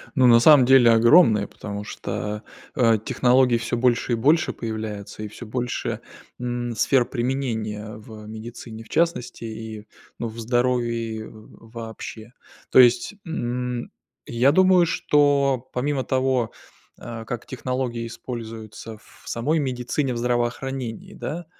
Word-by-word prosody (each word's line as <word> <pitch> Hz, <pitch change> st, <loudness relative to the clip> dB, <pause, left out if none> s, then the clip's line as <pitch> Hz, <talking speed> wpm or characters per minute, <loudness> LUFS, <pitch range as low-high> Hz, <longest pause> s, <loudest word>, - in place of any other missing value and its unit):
Ну, 130 Hz, -2 st, +5 dB
на 115 Hz, -1 st, +7 dB
самом 145 Hz, -1 st, +7 dB
деле 125 Hz, -3 st, +7 dB
огромная, 115 Hz, -, +5 dB
потому 105 Hz, 0 st, -7 dB
что, 105 Hz, 0 st, -5 dB, 0.3 s
э, 115 Hz, -3 st, +4 dB
технологий 125 Hz, 0 st, +3 dB
всё 115 Hz, +1 st, -2 dB
больше 120 Hz, 0 st, +1 dB
и -, -, +3 dB
больше 150 Hz, +8 st, +2 dB
появляется. 110 Hz, -2 st, -6 dB
И 105 Hz, -, -4 dB
всё 120 Hz, +3 st, -10 dB
больше, 120 Hz, +2 st, -3 dB, 0.4 s
м, 120 Hz, -1 st, -3 dB
сфер 125 Hz, +3 st, +3 dB
применения 115 Hz, -5 st, -3 dB
в 110 Hz, 0 st, -11 dB
медицине 110 Hz, 0 st, -9 dB
в -, -, -20 dB
частности 160 Hz, -8 st, -1 dB
и, 110 Hz, -1 st, -7 dB, 0.3 s
ну, 115 Hz, -, -2 dB
в 115 Hz, +1 st, -9 dB
здоровье 115 Hz, -2 st, -1 dB
в 110 Hz, +1 st, -16 dB
вообще. 115 Hz, 0 st, -8 dB, 0.4 s
То -, -, +7 dB
есть, 125 Hz, -, +5 dB
м, 125 Hz, -5 st, -3 dB, 0.3 s
я 120 Hz, +4 st, +3 dB
думаю, 185 Hz, +1 st, +5 dB
что 140 Hz, -5 st, +2 dB
помимо 135 Hz, +1 st, -1 dB
того, 130 Hz, -3 st, 0 dB, 0.5 s
э, 115 Hz, -1 st, -7 dB
как 120 Hz, 0 st, -5 dB
технологии 125 Hz, -2 st, -3 dB
используются 115 Hz, -2 st, -8 dB
в -, -, -21 dB
самой 150 Hz, +8 st, 0 dB
медицине, 130 Hz, 0 st, -1 dB
в -, -, -4 dB
здравоохранении, 120 Hz, 0 st, -2 dB
да, 170 Hz, +2 st, -5 dB
120 Hz, 135 wpm, -23 LUFS, 110-130 Hz, 0.5 s, на